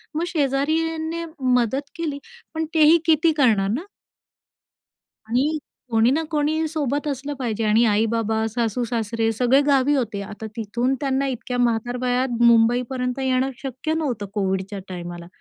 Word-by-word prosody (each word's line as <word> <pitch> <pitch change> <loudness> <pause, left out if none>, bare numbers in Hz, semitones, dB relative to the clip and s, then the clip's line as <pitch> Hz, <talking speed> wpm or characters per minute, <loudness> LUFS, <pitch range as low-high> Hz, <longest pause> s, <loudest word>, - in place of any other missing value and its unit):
मग 320 - 0
शेजाऱ्यांनी 320 +3 -1 0.3
मदत 265 +4 0
केली. 310 -4 -3 0.3
पण 320 0 -1
तेही 315 +1 +6
किती 320 0 +4
करणार 210 -7 +3
ना? 330 +10 -4 1.4
आणि 265 +8 +1 0.3
कोणी 225 +2 +4
ना 320 +4 +1
कोणी 310 +1 +1
सोबत 290 -2 -2
असलं 285 +1 -3
पाहिजे 225 -3 -2
आणि 215 +2 +4
आई-बाबा, 220 +1 +1
सासू-सासरे 230 -1 -1
सगळे 250 +5 +3
गावी 275 0 +3
होते. 225 -6 -2
आता 210 +2 -8
तिथून 235 +4 -1
त्यांना 275 0 0
इतक्या 250 -1 -4
म्हातारवयात 245 +1 0
मुंबईपर्यंत 245 +2 +3
येणं 260 0 +1
शक्य 270 +4 -3
नव्हतं 260 -10 -2
कोव्हिडच्या 195 0 -2
टाईमाला. 175 -1 -7
250 Hz, 130 wpm, -22 LUFS, 225-290 Hz, 1.4 s, तेही